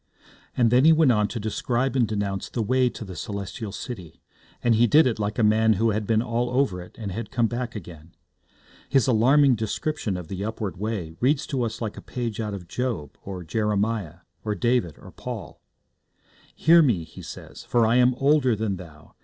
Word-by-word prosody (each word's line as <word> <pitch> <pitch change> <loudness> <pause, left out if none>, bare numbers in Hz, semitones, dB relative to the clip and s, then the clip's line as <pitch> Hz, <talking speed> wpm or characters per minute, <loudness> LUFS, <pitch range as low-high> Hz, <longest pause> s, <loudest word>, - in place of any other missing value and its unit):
And 120 -2 +4
then 125 +2 +5
he 160 - +7
went 160 -4 +5
on 105 -3 +2
to 115 - -5
describe 120 +5 -1
and 120 -4 +3
denounce 100 -2 -3
the 115 - -2
way 130 +3 +2
to 115 - -8
the 95 -2 -8
Celestial 100 +3 -5
City, 90 -7 -8 0.4
and 120 - +4
he 115 +2 +4
did 155 +8 +6
it 115 -4 0
like 105 0 -2
a 120 - +2
man 110 +1 +4
who 110 +3 +2
had 105 0 -2
been 110 0 +2
all 120 0 -1
over 125 -8 0
it, 90 - -13
and 105 -4 -5
had 110 +3 -5
come 120 -3 +1
back 120 +1 -3
again. 85 -4 -10 0.7
His 135 -5 +3
alarming 130 +4 +5
description 110 0 -2
of 90 -3 -7
the 95 +2 -5
upward 105 -3 -4
way 100 -6 -3
reads 135 +3 +2
to 135 -3 -2
us 115 0 -3
like 110 -3 -4
a - - -7
page 120 -4 -4
out 105 -2 -2
of 90 -3 -9
Job, 110 - -3
or 95 -2 -7
Jeremiah, 105 -2 -1 0.2
or 105 -1 -1
David, 105 - 0
or - - -13
Paul. - - -8 0.9
'Hear 165 +1 +6
me,' 115 - +2
he 80 - -12
says, - - -10
'for 120 -2 +2
I 115 +2 +3
am 125 0 +4
older 135 -3 +3
than 105 -2 -2
thou. 80 -4 -13
110 Hz, 205 wpm, -25 LUFS, 100-125 Hz, 0.9 s, he